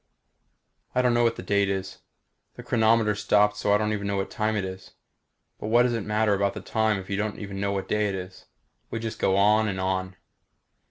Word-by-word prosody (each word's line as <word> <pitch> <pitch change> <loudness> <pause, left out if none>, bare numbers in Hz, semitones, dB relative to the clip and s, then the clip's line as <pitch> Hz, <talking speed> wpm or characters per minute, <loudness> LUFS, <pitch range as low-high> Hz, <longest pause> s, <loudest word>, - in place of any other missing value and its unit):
I 125 - +3
don't 125 -1 +3
know 120 0 +3
what 115 -1 +2
the - - -8
date 100 -1 +1
is. 95 -1 -4 0.6
The - - -10
chronometer 110 -1 +3
stopped 105 0 +2
so 105 - 0
I 105 - +5
don't 105 0 -1
even 100 -1 -3
know 100 - -1
what 95 - -3
time 110 0 -1
it 100 -2 -1
is. 95 0 -9 0.7
But - - -5
what 120 +2 +5
does 125 -1 +1
it 115 -3 -2
matter 105 0 +2
about 100 0 0
the - - -4
time 110 -1 0
if 95 -1 -8
you 100 - -2
don't 105 0 -2
even 100 -2 -6
know 100 0 0
what 95 -1 -3
day 105 -1 +1
it 95 - -3
is? 95 0 -9 0.4
We - - -4
just 115 -1 -5
go 95 - +2
on 105 +2 +4
and 95 -2 -3
on. 95 0 -2
105 Hz, 230 wpm, -26 LUFS, 100-110 Hz, 0.7 s, I